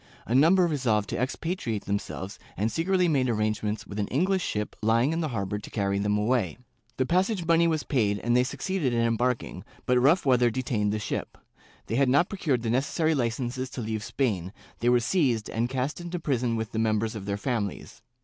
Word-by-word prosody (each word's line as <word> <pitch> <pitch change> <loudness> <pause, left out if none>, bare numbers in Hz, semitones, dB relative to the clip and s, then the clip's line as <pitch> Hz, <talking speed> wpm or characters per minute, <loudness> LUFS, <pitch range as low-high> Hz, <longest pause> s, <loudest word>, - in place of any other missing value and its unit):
A 115 - -2
number 170 +8 +5
resolved 120 -10 0
to - - -1
expatri 130 -1 -2
ate 100 - -6
themselves 100 -1 -4 0.2
and 110 +3 0
secretly 180 +2 +2
made 135 -6 +2
arrangements 110 -1 -1
with 100 - -6
an 100 - 0
English 185 +7 +1
ship 105 -8 -3
lying 115 +7 +3
in 165 - -1
the 160 - 0
harbor 105 -5 -3
to - - -10
carry 100 -2 -1
them 105 +1 +1
away. 105 -4 0 0.4
The 130 - +1
passage 185 - +1
money 170 0 +4
was 160 -2 0
paid 105 -7 +1
and 120 +3 0
they 125 - +5
succeeded 140 +1 -2
in 115 - +2
embarking, 115 -4 0 0.2
but 125 0 +3
rough 155 +7 +4
weather 125 -2 +4
detained 110 -4 -1
the 105 - -1
ship; 105 - -4 0.5
they 115 - -2
had 135 -1 +3
not 145 +7 +3
procured 150 - -1
the 115 - 0
necessary 155 +6 +1
Ucences 125 0 -2
to 125 - -4
leave 110 -1 -3
Spain, 100 -7 -1 0.3
they 120 - +2
were 125 0 +5
seized 120 - +1
and 115 +2 -1
cast 130 +5 -2
into 175 +1 -4
prison 125 -7 0
with 110 0 -3
the 110 - -2
members 110 0 +1
of 105 -3 -7
their 100 0 -1
families. 115 -1 -3
120 Hz, 205 wpm, -27 LUFS, 110-145 Hz, 0.5 s, number